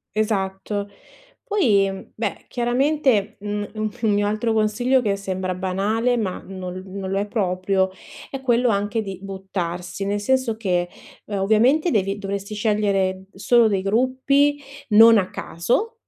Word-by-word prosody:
Esatto. 205 -1 -1 0.5
Poi 200 - +1
beh, 225 - -4
chiaramente, 245 -3 +1
mhmm, 205 0 -3
un 215 0 -1
un 220 -2 +2
mio 205 0 +2
altro 215 +2 0
consiglio 220 +4 +2
che 205 -4 0
sembra 190 -1 -3
banale, 205 +6 0
ma, 195 -5 -2
mhmm, 190 0 -9
no 185 -1 -5
non 190 0 -6
lo 195 - 0
è 200 - -1
proprio, 190 -2 0 0.4
è 270 - -6
quello 245 -1 +2
anche 205 +1 0
di 195 -3 -6
buttarsi. 190 -2 -5
Nel 205 +1 -1
senso 250 +1 0
che, 180 -5 0 0.4
ehm, 205 -2 -3
ovviamente 235 - +3
devi 195 -2 0
dovresti 200 +1 -5
scegliere 200 -3 0
solo 235 +4 +4
dei 195 -2 0
gruppi 260 +7 +2 0.3
non 225 +1 +8
a 185 -2 +1
caso, 245 - -1
205 Hz, 145 wpm, -22 LUFS, 195-235 Hz, 0.5 s, non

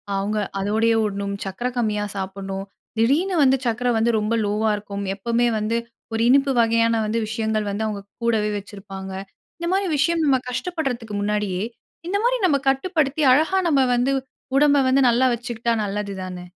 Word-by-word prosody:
அவுங்க 205 +2 -1 0.2
அதோடையே 220 +3 +2
ஓடணும், 200 -1 -2
சக்கர 195 +6 -3
கம்மியா 210 -3 0
சாப்பிடணும். 195 0 -5 0.3
திடீர்னு 310 +12 +2
வந்து 265 0 +4
சக்கர 245 +1 0
வந்து 230 +1 +2
ரொம்ப 215 +2 -1
லோவ்‌வா 210 +1 +1
இருக்கும். 200 -1 -6
எப்பவுமே 235 +4 +1
வந்து, 220 +2 0 0.4
ஒரு 225 - 0
இனிப்பு 275 +1 +4
வகையான 230 0 +3
வந்து 220 +2 0
விஷயங்கள் 220 -1 -1
வந்து 220 +2 -2
அவுங்க 205 -2 -4 0.2
கூடவே 220 -2 +1
வச்சிருப்பாங்க. 195 -1 -8 0.5
இந்த 340 - -4
மாரி 390 0 +1
விஷயம் 330 +3 +2
நம்ம 270 -3 +3
கஷ்டப்படுறதுக்கு 250 - -3
முன்னாடியே, 205 -3 -1 0.5
இந்த 400 - +1
மாரி - - +3
நம்ம 285 -4 +3
கட்டுப்படுத்தி, 305 0 0
அழகா 320 +7 +3
நம்ம 275 -3 +4
வந்து 250 +3 +1 0.5
உடம்ப 290 0 +5
வந்து 270 +1 +4
நல்லா 245 +2 +3
வச்சுக்கிட்டா 235 0 -2
நல்லது 200 0 -3
தானே! 180 -1 -7
225 Hz, 155 wpm, -22 LUFS, 205-270 Hz, 0.5 s, உடம்ப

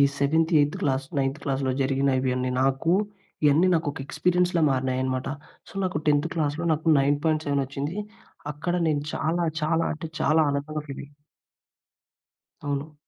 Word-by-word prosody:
ఈ - - +7
seventh, 160 +4 +2
eighth 145 +1 +1
class, 135 -1 0
ninth 135 +2 -1
క్లాస్‌లో 135 -1 0
జరిగిన 135 +1 +1
ఇవి 130 -1 0
అన్నీ 130 0 -1
నాకు 135 +5 +1 0.5
ఇయన్నీ 150 +5 +5
నాకొక 155 -3 -1
ఎక్స్పీరియన్స్‌లా 180 +1 +1
మారినాయనమాట. 130 0 -1 0.4
సో, - - -13
నాకు 180 -5 -1
10థ్ 145 +2 +3
క్లాస్‌లో 155 0 -1
నాకు 155 +1 -2
9.7 145 0 +1
వచ్చింది. 140 +6 -4 0.6
అక్కడ 160 +4 -3
నేను 145 -2 0
చాలా, 170 +2 0 0.2
చాలా 165 +1 +2
అంటే 155 +1 -6
చాలా 155 +1 +3
ఆనందంగా 145 +2 -3
ఫీల్ 140 - -6
అయ్ 145 - -18 1.5
అవును. 145 +2 -3
145 Hz, 140 wpm, -25 LUFS, 135-160 Hz, 1.5 s, ఈ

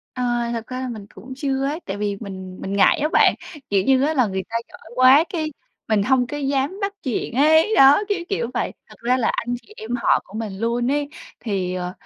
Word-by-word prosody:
À, 240 -1 -1
thật 230 -1 -4
ra 255 0 -5
là 260 - -3
mình 215 -4 -7
cũng 245 +8 -11
chưa 275 -1 -1
ấy, 300 +5 -2
tại 195 - -4
vì 205 -1 -2
mình 190 -3 -8
mình 195 - -5
ngại 200 - +4
á 300 - +1
bạn, - - +5 0.4
kiểu 195 -1 +2
như 265 0 +3
á, 310 +2 +1
là 255 -5 +3
người 190 -1 -3
ta 230 - -3
giỏi - - -15
quá, 260 +5 +6
cái 310 -3 -2 0.4
mình 210 -2 +2
hông 255 +1 +2
có 290 - -5
dám 280 +6 -1
bắt 400 0 -1
chuyện 240 -2 -3
ấy, 315 - +4
đó, 275 +8 +7
kiểu, 405 -3 0
kiểu 250 - -2
vậy. - - -1 0.2
Thật - - -14
ra 250 +2 +2
là 235 - +1
anh 245 +1 -2
chị 430 - -18
em 220 - -9
họ 235 - +2
của 195 - -17
mình 205 -4 -5
luôn 240 +3 0
ấy, 290 0 0 0.3
thì, 190 -5 -2
ờ, 180 0 -4
245 Hz, 240 wpm, -22 LUFS, 210-280 Hz, 0.4 s, đó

